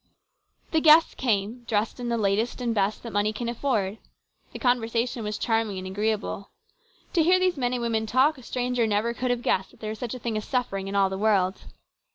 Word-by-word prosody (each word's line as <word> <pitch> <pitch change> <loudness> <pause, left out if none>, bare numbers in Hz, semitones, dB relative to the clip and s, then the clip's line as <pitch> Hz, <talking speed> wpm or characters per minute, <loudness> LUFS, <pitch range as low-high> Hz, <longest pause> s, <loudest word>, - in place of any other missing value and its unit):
The 320 - +2
guests 315 +1 +7
came, 225 0 -1
dressed 220 +1 -1
in 240 -1 -3
the 235 - 0
latest 215 +4 0
and 240 -2 -1
best 205 0 0
that 230 - -7
money 205 +1 +1
can 230 +2 -5
afford. 220 -5 -1 0.5
The - - -7
conversation 240 -1 0
was 210 0 -3
charming 225 -3 0
and 185 - -6
agreeable. 200 0 -2 0.6
To 340 - +3
hear 360 +3 +5
these 370 -1 +1
men 250 -3 -1
and 245 -1 -2
women 220 -1 0
talk 265 +5 +3
a - - -12
stranger 245 -1 -1
never 215 +3 0
could 250 +1 -2
have 245 -1 -1
guessed 190 +1 +1
that - - -21
there 215 -1 -4
was 215 - -7
such 245 0 -4
a - - -7
thing 230 -2 -2
as 215 - -4
suffering 195 -7 -2
in 195 - -4
all 195 -1 +3
the 190 - -4
world. 200 -3 +1
225 Hz, 215 wpm, -26 LUFS, 205-245 Hz, 0.6 s, guests